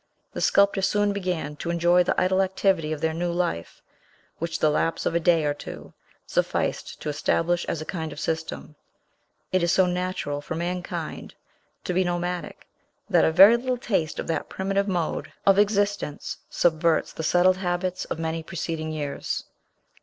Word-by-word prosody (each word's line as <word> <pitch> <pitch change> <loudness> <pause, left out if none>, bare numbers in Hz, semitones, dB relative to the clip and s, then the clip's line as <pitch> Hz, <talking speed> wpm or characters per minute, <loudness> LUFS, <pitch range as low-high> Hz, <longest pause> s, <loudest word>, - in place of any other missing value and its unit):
The - - -4
sculptor 200 0 +4
soon 205 +1 +2
began 180 -7 -3
to 170 - -5
enjoy 175 +1 +4
the 175 - +1
idle 185 +1 +3
activity 190 -4 +1
of 155 -1 -3
their 160 0 +1
new 175 +1 -1
life, 170 - -3 0.6
which 165 -1 -2
the 155 - +3
lapse 165 +2 0
of - - +1
a 170 - +2
day 165 -2 +3
or 145 - +1
two 145 - -10 0.3
sufficed - - -1
to - - -3
establish 170 +3 0
as 155 - -3
a - - -12
kind 160 -3 -4
of - - -8
system; 160 -1 -4 0.8
it 185 - +2
is 170 0 +2
so 190 - +4
natural 180 -5 -2
for 160 - -5
mankind 175 +1 -4 0.5
to 180 - -2
be 185 +1 +3
nomadic, 175 0 -3 0.5
that - - +5
a - - +3
very 195 +8 +8
little 255 +1 -2
taste 190 -10 -1
of - - -3
that 165 - -2
primitive 195 +1 -1
mode 175 -4 -2
of 195 0 +5
existence 205 -6 0
subverts 165 -1 +2
the - - -5
settled 180 +3 +4
habits 180 0 -2
of - - -4
many 165 0 -2
preceding 160 -1 -4
years. 145 -2 -3
175 Hz, 170 wpm, -25 LUFS, 160-185 Hz, 0.8 s, very